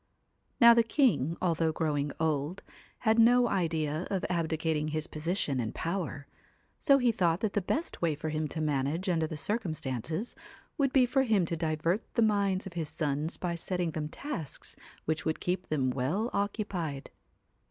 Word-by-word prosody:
Now 235 -1 +9
the 235 - +5
king, 225 - +2
although 165 -2 +2
growing 150 -3 -1
old, 155 +2 -1 0.4
had 225 -1 +3
no 245 +2 +6
idea 165 -4 -1
of 195 -2 -1
abdicating 160 -2 0
his 155 0 -2
position 155 -4 -1
and 115 -2 -3
power, 165 -5 -3 0.5
so 275 -2 +5
he 245 -3 +3
thought 175 -4 +1
that 215 -3 0
the 205 - +1
best 300 - -2
way 165 -3 +1
for 155 +2 -4
him 155 0 -1
to 155 +2 -4
manage 150 +4 0
under 160 -3 +1
the 155 - -6
circumstances 160 - -2 0.4
would 275 -4 +1
be 265 -2 +5
for 270 +2 +2
him 215 -8 +2
to 165 - -2
divert 165 +4 0
the 235 - +4
minds 200 -3 +1
of 190 - -7
his 165 -3 -3
sons 150 +1 -2
by 175 -1 -2
setting 175 0 -2
them 155 -1 -3
tasks 220 - -6 0.3
which 160 0 -1
would 160 - -1
keep 180 +1 -2
them 135 -4 +1
well 155 - -1
occupied. 200 -8 -2
165 Hz, 170 wpm, -30 LUFS, 155-205 Hz, 0.5 s, Now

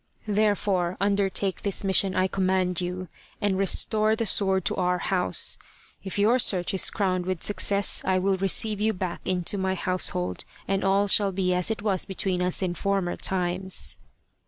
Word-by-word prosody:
Therefore 205 -4 0
undertake 200 -1 0
this 200 -1 -2
mission, 190 0 +2
I 185 - +2
command 185 -2 0
you, 180 +1 -4 0.3
and 205 -2 0
restore 215 +3 +1
the 230 - -2
sword 190 -2 +2
to - - 0
our 180 -1 +1
house. 180 - +1 0.4
If 190 0 -6
your 220 +5 +3
search 185 -4 +3
is 190 - +4
crowned 185 -3 -1
with 185 -3 -3
success, 200 -1 +1
I 190 -1 +1
will 190 +1 +1
receive 200 +2 +1
you 220 +1 +1
back 185 -2 -5
into 185 +2 -1
my 190 0 -1
household, 90 - -1 0.2
and 195 0 -1
all 195 +1 +2
shall 200 0 +4
be 185 -1 0
as 180 +2 0
it 220 -2 -3
was 195 -4 0
between 190 -1 -2
us 180 +1 0
in 180 -2 -1
former 195 -1 -1
times." 185 0 0
190 Hz, 170 wpm, -25 LUFS, 180-200 Hz, 0.4 s, is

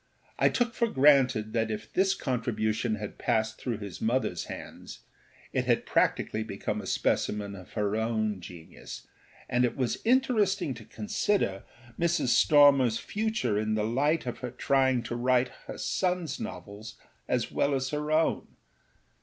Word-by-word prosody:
I - - +5
took 240 -1 0
for 235 0 +1
granted 130 - +4
that 115 -1 0
if 110 0 -6
this 190 +1 +2
contribution 115 - -1
had 105 -1 -7
passed 110 -2 0
through 120 -4 -2
his 100 -4 -8
motherâs 125 +4 0
hands - - -9 0.5
it - - 0
had - - +1
practically 110 - +1
become 100 -2 -4
a - - -9
specimen 105 -1 0
of 95 -2 -12
her 105 -1 0
own 110 -2 -1
genius, 85 -2 -10 0.4
and 125 +1 +1
it 120 - 0
was 130 -3 -1
interesting 215 - +2
to 110 -2 -11
consider 105 - -1 0.3
Mrs. 170 -5 +1
Stormerâs 140 -6 +5
future 205 - -1
in 110 0 0
the 105 -1 0
light 145 +8 +1
of 120 - -4
her 125 -1 -6
having 130 -3 +2
to 120 +1 -4
write 125 +1 +2 0.2
her - - -6
sonâs 180 -6 -1
novels 105 +2 -8 0.3
as - - -1
well 140 0 +1
as 130 0 -1
her 150 0 -2
own. 160 +1 +1
125 Hz, 155 wpm, -28 LUFS, 110-150 Hz, 0.5 s, I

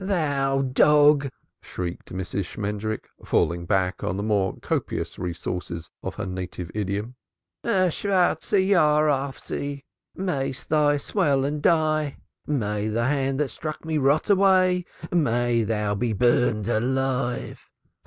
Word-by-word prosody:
"Thou 140 -8 +1
dog!" 145 +2 +5 0.3
shrieked 90 -1 -6
Mrs. 95 +1 -3
Shmendrik, 105 +3 -4 0.2
falling 85 0 0
back 95 -1 0
on 95 - -1
the 100 - -2
more 100 -3 0
copious - - -3
resources 85 -1 -5
of - - -5
her 110 - -4
native 90 -2 -5
idiom. 105 +3 -3 0.5
"A 185 -3 +2
black 190 -3 +1
year 195 -2 +4 0.3
on 140 -1 +1 0.2
thee! 140 0 -4 0.3
Mayest 140 -9 -3
thou 150 -1 +3
swell 140 -4 +1
and 145 +1 -2
die! 155 -3 +2 0.3
May 105 -7 -1
the 115 +2 0
hand 135 0 0
that 145 - 0
struck 155 +5 -6
me 160 -1 0
rot 140 +3 +2
away! 185 -2 +4 0.3
Mayest 120 -8 +1
thou 105 -2 0
be 110 +3 -1
burned 110 -1 +2
alive! 130 +2 -1
135 Hz, 130 wpm, -25 LUFS, 105-150 Hz, 0.5 s, dog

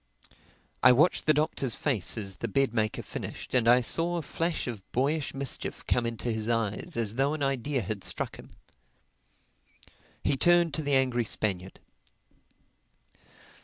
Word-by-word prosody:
I 125 +1 +8
watched 155 +7 +2
the 155 - +6
Doctor's 145 -5 0
face 115 - 0
as 100 -4 -4
the - - -3
bed 135 -4 +1
maker 110 -2 -1
finished, - - -7
and 125 -3 +3
I 125 +1 +6
saw 165 +9 +1
a 165 - -3
flash 165 +3 -2
of 115 -5 -5
boyish 140 +4 0
mischief 135 -1 -3
come 120 -1 +1
into 115 +1 -3
his 110 0 -2
eyes 115 -1 -1
as 115 -1 0
though 140 +3 +1
an 150 - -3
idea 135 -1 -1
had 100 +1 -4
struck - - -2
him. - - -13 1.7
He 140 - +2
turned 175 +1 +4
to 155 - -1
the 145 -2 +1
angry 130 -2 +2
Spaniard. 95 -3 -3
125 Hz, 155 wpm, -28 LUFS, 115-145 Hz, 1.7 s, I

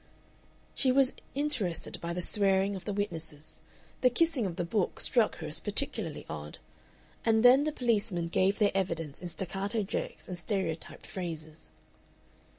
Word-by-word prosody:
She 260 - +3
was 265 0 +4 0.2
interested 265 - +1
by 170 - -3
the 180 +1 -3
swearing 195 0 +2
of 190 - -8
the 210 - -2
witnesses. 160 -7 -4 0.4
The 255 - +6
kissing 265 -3 +1
of 175 - -5
the 175 - -2
book 190 +2 -1
struck - - +4
her - - -6
as - - -1
particularly - - 0
odd, 75 0 -7 0.7
and 220 +1 +3
then 265 +4 +7
the 310 - 0
policemen 215 - 0
gave 190 +4 +2
their 210 -2 +3
evidence 165 -6 -2
in 180 - -5
staccato 195 +5 -2
jerks 195 - -4
and 180 - -5
stereotyped 180 -5 -3
phrases. 160 - -7
195 Hz, 155 wpm, -30 LUFS, 170-225 Hz, 0.7 s, then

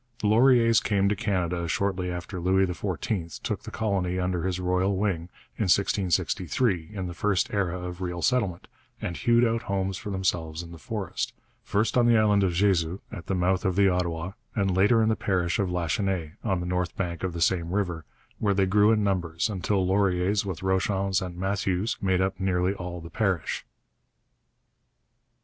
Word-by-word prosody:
The 105 - 0
Lauriers 115 0 +5
came 100 -2 +2
to 105 - +1
Canada 90 -4 -1
shortly 95 +1 -1
after 90 +2 -5
Louis 95 +2 +3
XIV 90 -1 -3
took - - -2
the - - -8
colony 95 -4 -1
under 90 -1 -1
his 90 -1 -1
royal 90 +2 +1
wing 90 -4 -1 0.3
in 110 - 0
1663, 95 - +1
in 95 -3 -4
the 90 - -5
first 100 +2 0
era 90 -3 0
of 90 +1 -6
real 90 -1 -3
settlement, 105 -9 0 0.3
and 85 - -4
hewed 120 +4 +3
out 115 0 0
homes 95 -3 -2
for 105 - -7
themselves 85 -4 -1
in 85 - -11
the 85 - -10
forest, 105 0 -4 0.3
first 110 +4 +1
on 120 - +4
the 120 -1 +5
island 105 -2 +4
of 90 -2 +1
Jesus, 90 -2 +2
at 100 -7 -8
the 95 - 0
mouth 95 +1 +1
of 95 -3 0
the 100 0 +5
Ottawa, 85 -1 -1 0.2
and 95 -4 +1
later 105 +4 +4
in 110 - +2
the 110 - +2
parish 90 -4 0
of 100 -2 +1
Lachenaie, 90 -1 -1
on 95 -5 0
the - - -4
north 90 0 -2
bank 85 -3 -3
of 95 -2 -1
the 85 - -5
same 85 0 +1
river, 90 -5 -1 0.4
where 100 -2 +1
they 95 0 +3
grew 105 +3 +4
in 110 -2 +2
numbers 90 -1 0
until 95 0 0
Lauriers, 95 +1 +2
with 95 -2 -5
Rochons 95 +1 +1
and 90 -2 -6
Matthieus, 95 +2 -1
made 95 -1 +2
up 95 0 -1
nearly 95 0 +1
all 90 -2 -6
the 85 - -10
parish. 95 -7 -1
95 Hz, 185 wpm, -26 LUFS, 90-100 Hz, 0.4 s, Lauriers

